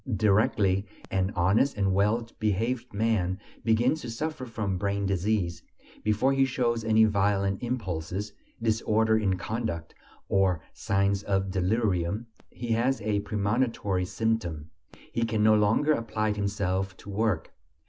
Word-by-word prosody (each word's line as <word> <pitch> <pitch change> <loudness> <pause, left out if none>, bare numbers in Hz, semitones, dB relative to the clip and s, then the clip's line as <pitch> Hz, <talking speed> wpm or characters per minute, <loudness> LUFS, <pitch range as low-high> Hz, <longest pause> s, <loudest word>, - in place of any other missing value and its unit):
Directly 100 -1 +2 0.2
an 95 0 +1
honest 100 +9 +2
and 95 -2 +2
well 105 +4 +2
behaved 115 +4 -1
man 100 -3 0 0.2
begins 120 +7 +2
to 120 - -6
suffer 130 +2 -4
from 105 -5 -2
brain 100 0 -1
disease, 95 -3 0 0.4
before 105 +6 +2
he 135 0 +3
shows 120 -3 0
any 110 0 +5
violent 100 -1 +1
impulses, 100 -4 -3 0.3
disorder 110 0 +2
in 100 -4 +1
conduct, 90 -4 -4 0.3
or 95 -3 +2
signs 100 0 +1
of 95 -1 -1
delirium, 95 +1 0 0.2
he 120 - -7
has 120 +4 +2
a 105 -1 0
premonitory 105 -2 0
symptom: 90 -7 -2 0.4
he 115 - -2
can 110 -2 +1
no 110 0 +6
longer 110 +8 +3
apply 110 -4 -1
himself 100 -2 -1
to 100 - -10
work. 100 -5 -1
105 Hz, 130 wpm, -28 LUFS, 95-115 Hz, 0.4 s, no